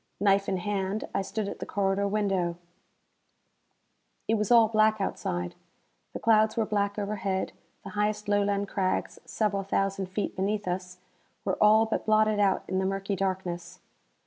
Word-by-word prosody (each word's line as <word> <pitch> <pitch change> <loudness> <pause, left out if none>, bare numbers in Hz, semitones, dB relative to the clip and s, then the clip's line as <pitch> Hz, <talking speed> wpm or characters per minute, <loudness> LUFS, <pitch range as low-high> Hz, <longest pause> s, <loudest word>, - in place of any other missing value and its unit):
Knife 200 0 +3
in 190 - 0
hand, 195 +2 -2
I - - +1
stood 205 +1 -3
at - - -6
the - - -4
corridor 200 0 0
window. 195 -4 0 1.7
It - - +2
was 210 -2 0
all 230 -2 +7
black 215 0 +3
outside. 90 - -2 0.6
The - - -4
clouds 220 0 +3
were 225 - +2
black 205 -1 -1
overhead; 200 -2 -2 0.3
the 200 - -7
highest 210 +1 -1
Lowland 205 0 +1
crags, 190 -2 -1
several 205 -2 0
thousand 195 0 -1
feet 195 +3 -3
beneath 200 +1 -1
us, 180 0 -3 0.5
were - - -1
all 215 +1 +6
but 220 - -3
blotted 215 -1 +3
out 195 -2 +2
in 185 0 0
the 190 - 0
murky 195 +1 -2
darkness. 180 -2 -3
200 Hz, 155 wpm, -28 LUFS, 190-215 Hz, 1.7 s, all